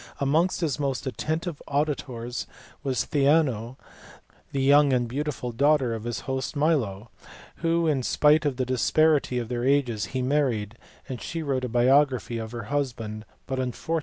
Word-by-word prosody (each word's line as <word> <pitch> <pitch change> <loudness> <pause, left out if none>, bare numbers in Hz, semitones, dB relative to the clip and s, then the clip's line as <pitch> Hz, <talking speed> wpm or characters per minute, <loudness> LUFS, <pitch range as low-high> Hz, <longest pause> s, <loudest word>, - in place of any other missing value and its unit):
Amongst 160 +7 +1
his 150 -4 -1
most 135 -3 -2
attentive 155 +4 -3
auditors 135 -5 -2 0.3
was 135 -3 -1
Theano, 135 -5 +2 0.7
the 135 -1 -1
young 145 +1 +5
and 120 -1 +1
beautiful 135 -1 -3
daughter 140 0 +2
of 110 0 -5
his 115 -5 -3
host 130 +2 -3
Milo, 120 -9 0 0.5
whom, 165 0 +1
in 145 -4 +1
spite 150 +4 +3
of 145 -4 -1
the 130 - 0
disparity 135 +2 +2
of 120 -2 -2
their 120 0 -3
ages, 125 -6 +1
he 130 +6 -3
married: 125 -6 0 0.4
she 165 -1 -4
wrote 135 -3 -1
a - - -4
biography 125 -2 +3
of 110 -1 -6
her 120 -2 -5
husband 115 -4 -3 0.2
but 130 -1 -3
unfortunately 130 -1 0
it 120 - -9
is - - -15
lost. 165 0 +2
130 Hz, 165 wpm, -26 LUFS, 120-150 Hz, 0.7 s, young